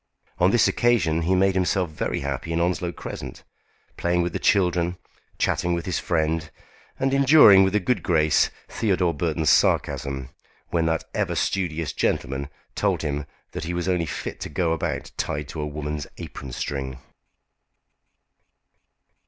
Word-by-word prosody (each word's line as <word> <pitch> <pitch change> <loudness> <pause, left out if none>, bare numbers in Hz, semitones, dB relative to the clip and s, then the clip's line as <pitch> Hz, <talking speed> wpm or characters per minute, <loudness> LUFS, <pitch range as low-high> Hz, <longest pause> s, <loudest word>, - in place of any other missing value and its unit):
On 90 - +5
this 120 +4 +4
occasion 110 -10 +2
he 90 +3 +2
made 95 +1 +3
himself 90 -2 0
very 75 - -2
happy 70 +4 -3
in 85 - 0
Onslow 85 0 0
Crescent, - - -8 0.5
playing 85 0 +1
with 85 -1 -3
the - - -2
children, 90 -3 +2 0.4
chatting 90 0 +1
with 85 - -4
his 95 - -1
friend, 80 -1 0 0.5
and 135 0 +1
enduring, 135 -8 +8
with 95 +1 +1
a - - +4
good 120 +6 0
grace, 80 -3 +3 0.2
Theodore 90 -6 +1
Burton's 80 -2 +1
sarcasm, 65 +1 +1 0.4
when 85 -1 +1
that 80 0 0
ever - - -1
studious 80 -4 -1
gentleman 70 +2 -1 0.2
told - - 0
him 75 0 -2 0.2
that 80 - -5
he 85 +1 -3
was 90 +1 -2
only 90 -3 +1
fit - - -5
to - - -5
go 85 -3 0
about 80 - -3
tied 75 0 -2
to 80 - -5
a 75 - -2
woman's 75 0 -4
apron 70 -2 -8
string. 65 +1 -4
85 Hz, 155 wpm, -24 LUFS, 75-90 Hz, 0.5 s, enduring